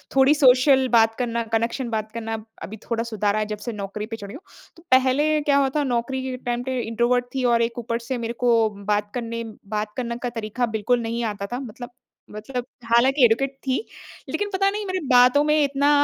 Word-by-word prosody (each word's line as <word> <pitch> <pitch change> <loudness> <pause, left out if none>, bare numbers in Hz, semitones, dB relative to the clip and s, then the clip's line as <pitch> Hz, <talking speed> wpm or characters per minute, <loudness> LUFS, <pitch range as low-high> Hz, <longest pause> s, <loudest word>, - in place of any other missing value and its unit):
थोड़ी 270 +2 +6
सोशल 265 -1 +5
बात 225 -1 +5
करना, 235 -1 -1
कनेक्शन 230 +3 -1
बात 215 -1 -3
करना 225 -1 -4
ब 215 - -12 0.2
अभी 220 - -7
थोड़ा 230 -1 0
सुधार 210 -3 -1
रहा 215 - 0
है 215 - 0
जब 210 0 -4
से 235 +3 -5
नौकरी 205 +1 -5
पे 225 +1 -6
चढ़ी 205 -2 -9
हूँ। 295 - -9 0.4
तो 335 - -17
पहले 270 +4 +3
क्या 290 -1 +2
हुआ 275 -1 +3
था 300 - +2
नौकरी 260 0 -1
के 260 -1 -3
टाइम 245 -1 -3
पे 260 0 -2
इंट्रोवर्ट 240 +2 +1
थी 260 - -1
और 235 - +3
एक 235 +1 -1
ऊपर 230 0 -3
से 240 +2 -4
मेरे 235 0 -3
को 245 - +4 0.4
बात 205 0 0
करने 230 -1 -4 0.3
बात 210 0 -2
करने 235 -2 -3
का 245 - 0
तरीका 230 +1 -2
बिल्कुल 240 +3 +1
नहीं 230 +1 -3
आता 205 -2 -3
था। 245 - -2
मतलब 245 -1 -8 0.4
मतलब 240 +4 -5 0.2
हालाँकि 250 +4 +4
एजुकेट 265 +4 +1
थी 260 - +2 0.5
लेकिन 410 0 -2
पता 390 +1 +2
नहीं 415 +1 -4
मेरे 370 -1 -2
बातों 250 +3 +6
में 300 0 +3
इतना 280 0 +1
240 Hz, 215 wpm, -23 LUFS, 225-265 Hz, 0.5 s, थोड़ी